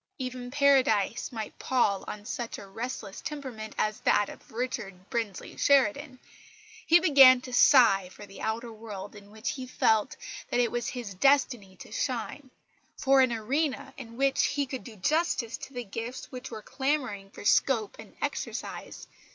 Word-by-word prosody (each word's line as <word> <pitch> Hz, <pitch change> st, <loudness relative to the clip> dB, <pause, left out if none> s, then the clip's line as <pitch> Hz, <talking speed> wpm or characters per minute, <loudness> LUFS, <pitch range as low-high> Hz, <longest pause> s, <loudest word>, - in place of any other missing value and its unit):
Even 255 Hz, -1 st, -5 dB
Paradise 260 Hz, -6 st, +2 dB
might 220 Hz, -3 st, -6 dB
pall 210 Hz, -7 st, +1 dB
on 210 Hz, 0 st, -7 dB
such 240 Hz, 0 st, -4 dB
a -, -, -9 dB
restless 210 Hz, 0 st, -6 dB
temperament 255 Hz, -8 st, -6 dB
as 215 Hz, -1 st, 0 dB
that 205 Hz, -, +2 dB
of -, -, -13 dB
Richard 215 Hz, -6 st, -5 dB
Brinsley 225 Hz, -5 st, -3 dB
Sheridan. 280 Hz, 0 st, +2 dB, 0.7 s
He 340 Hz, +2 st, +7 dB
began 275 Hz, -7 st, +8 dB
to 255 Hz, -1 st, -9 dB
sigh 225 Hz, -8 st, +6 dB
for 205 Hz, -, -12 dB
the 195 Hz, -1 st, -12 dB
outer 225 Hz, +1 st, -3 dB
world 210 Hz, -3 st, -8 dB
in 200 Hz, -1 st, -13 dB
which 220 Hz, +3 st, -4 dB
he 260 Hz, -3 st, -6 dB
felt 220 Hz, -4 st, +1 dB, 0.3 s
that 245 Hz, -, 0 dB
it 240 Hz, -2 st, +2 dB
was 240 Hz, -1 st, -2 dB
his 240 Hz, -6 st, -5 dB
destiny 245 Hz, -3 st, +2 dB
to 185 Hz, -, -13 dB
shine, 255 Hz, +4 st, -3 dB, 0.5 s
for 270 Hz, 0 st, +4 dB
an 255 Hz, -2 st, +3 dB
arena 265 Hz, +7 st, -1 dB
in 230 Hz, -3 st, -10 dB
which 275 Hz, 0 st, +2 dB
he 285 Hz, -1 st, 0 dB
could 260 Hz, -1 st, -6 dB
do 230 Hz, -4 st, -11 dB
justice 270 Hz, -, 0 dB
to 270 Hz, -, -10 dB
the 245 Hz, -1 st, -4 dB
gifts 240 Hz, +5 st, -6 dB
which 250 Hz, -1 st, -7 dB
were 220 Hz, -2 st, -8 dB
clamouring 255 Hz, -8 st, -2 dB
for 205 Hz, -, -11 dB
scope 225 Hz, -1 st, +2 dB
and -, -, -12 dB
exercise. -, -, -5 dB
240 Hz, 165 wpm, -28 LUFS, 215-265 Hz, 0.7 s, began